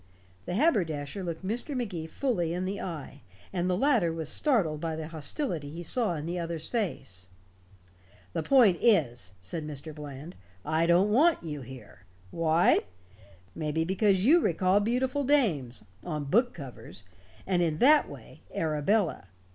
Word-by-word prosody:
The 175 - -2
haberdasher 175 - 0
looked 170 +1 -5
Mr. 240 +7 -3
Magee 185 -10 -4
fully 175 -7 -1
in 180 +1 -2
the 195 +2 -3
eye, 150 -5 -7 0.3
and 175 +1 0
the 180 - +1
latter 235 - +3
was 160 -2 -4
startled 180 - +1
by 165 -1 -2
the 155 0 -6
hostility 160 - -2
he 165 +4 -7
saw 215 -1 +1
in 150 -1 -5
the 175 +2 -3
other's 165 -2 -3
face. 115 - -3 1.0
"The - - -1
point 215 - +5
is," 120 - +2
said 95 - -4
Mr. 150 +1 -7
Bland, 150 +2 -9 0.3
"I 160 +1 +1
don't 180 +4 +4
want 310 - +4
you 150 -3 -5
here. 120 -8 -12 0.3
Why? 165 +1 +3 0.7
Maybe 160 0 -1
because 190 +2 +2
you 320 +7 +6
recall 185 - +2
beautiful 255 +6 0
dames 190 - +1 0.2
on 155 -4 -3
book 235 - +2
covers 125 - -10 0.4
and 180 -2 +1
in 160 -3 0
that 295 - +5
way, - - -12
Arabella. 160 - 0
170 Hz, 150 wpm, -28 LUFS, 150-210 Hz, 1.0 s, you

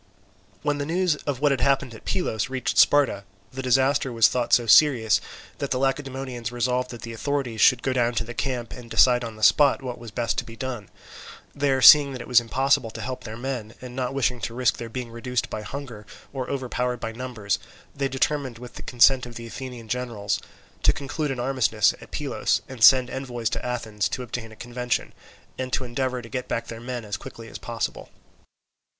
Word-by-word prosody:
When 145 -1 0
the 145 - -2
news 175 0 +1
of 140 -2 -2
what 145 -1 +4
had 135 - 0
happened 135 -3 +2
at 110 - -13
Pylos 135 - -1
reached 130 -1 -1
Sparta, 140 -9 +4 0.3
the 130 - -4
disaster 135 +2 +2
was 115 -2 +5
thought 125 -2 -1
so 120 - +5
serious 115 -1 +5 0.4
that 140 - -2
the 125 - 0
Lacedaemonians 135 -3 -2
resolved 125 +1 0
that 120 -2 -9
the 115 - -6
authorities 130 -2 -2
should 125 -1 +5
go 130 - 0
down 120 -1 +1
to 115 - +1
the 120 +1 -8
camp, 125 -2 -3
and 120 -2 -10
decide 125 +1 +4
on 115 -2 -6
the 110 - -9
spot 135 +5 +5
what 125 -2 -5
was 120 -1 -9
best 115 +2 -1
to - - -3
be 115 - -11
done. 120 -5 -5 0.6
There, 135 -2 +1
seeing 145 -2 +9
that 125 - -6
it - - -9
was 125 -1 +6
impossible 130 +1 +1
to 110 0 -8
help 125 +4 -5
their 110 0 -7
men, 120 -3 -5
and 125 -1 -9
not 130 0 -2
wishing 125 -2 0
to 115 +3 -4
risk 125 0 +2
their 115 - -6
being 120 0 -6
reduced 125 +1 -3
by 110 - -4
hunger 115 -2 -8 0.3
or 130 -2 -4
overpowered 125 -2 -2
by 115 - -4
numbers, 115 -4 -3 0.4
they 140 -1 0
determined, 135 -1 -1
with 125 +1 -10
the - - -9
consent 125 +1 +4
of 120 - -11
the 115 - -7
Athenian 120 -1 -8
generals, 115 -4 -2 0.4
to - - +4
conclude 145 +2 -3
an 135 -2 -3
armistice 120 -5 +2
at - - -12
Pylos - - -1
and 130 -4 -5
send 130 +1 +7
envoys 120 -4 -3
to - - -3
Athens 115 -4 -2
to 130 - -4
obtain 115 -1 -6
a - - -12
convention, 120 +1 -3 0.5
and 130 0 -3
to - - +1
endeavour 125 0 -2
to - - -9
get 125 0 -4
back 115 - -3
their 115 0 -7
men 120 -1 -5
as 105 -2 -4
quickly 115 +4 -10
as - - -8
possible. 115 -2 -4
125 Hz, 210 wpm, -25 LUFS, 115-135 Hz, 0.6 s, seeing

